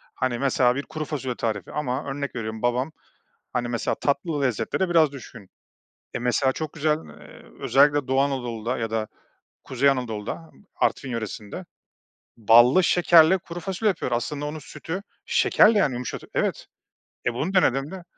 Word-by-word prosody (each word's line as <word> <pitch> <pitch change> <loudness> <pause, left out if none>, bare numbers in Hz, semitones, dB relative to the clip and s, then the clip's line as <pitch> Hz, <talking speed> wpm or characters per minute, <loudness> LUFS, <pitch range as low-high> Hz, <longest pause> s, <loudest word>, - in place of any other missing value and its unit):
hani, 125 -2 -1
mesela 130 -2 +2
bir 140 - -3
kuru 155 -1 -5
fasulye 130 -5 -4
tarifi 105 -5 -3
ama 135 -2 -2
örnek 140 -1 -4
veriyorum 110 -1 -5
babam, 125 +4 0 0.6
hani, 120 -1 -1
mesela 120 -1 -1
tatlı 145 +1 -1
lezzetlere 125 - 0
biraz 160 -4 +4
düşkün. 120 -7 -11 0.7
E, - - -1
mesela 125 +2 +1
çok 155 +2 -5
güzel, 155 0 +1 0.2
eee, - - -14 0.2
özellikle 145 0 +3
Doğu 135 +1 +2
Anadolu'da 125 -4 -2
ya 115 -2 -3
da 110 -1 -2 0.6
Kuzey 135 +2 +1
Anadolu'da, 125 +4 -4 0.3
Artvin 135 - 0
yöresinde 110 -3 -5 0.7
ballı 120 - +6
şekerle 175 0 +5
kuru 175 0 -8
fasulye 195 +5 -1
yapıyor. 170 -9 -3
Aslında 145 +5 -2
onun 155 +1 -5
sütü 165 +4 -6 0.2
şekerle, 215 0 +4
yani, 150 -9 +2
yumuşatı 125 +1 -5
Evet. - - -1 0.6
E, 120 - +1
bunu 155 +10 -2
denediğinde 165 0 +1
135 Hz, 150 wpm, -24 LUFS, 120-155 Hz, 0.7 s, ballı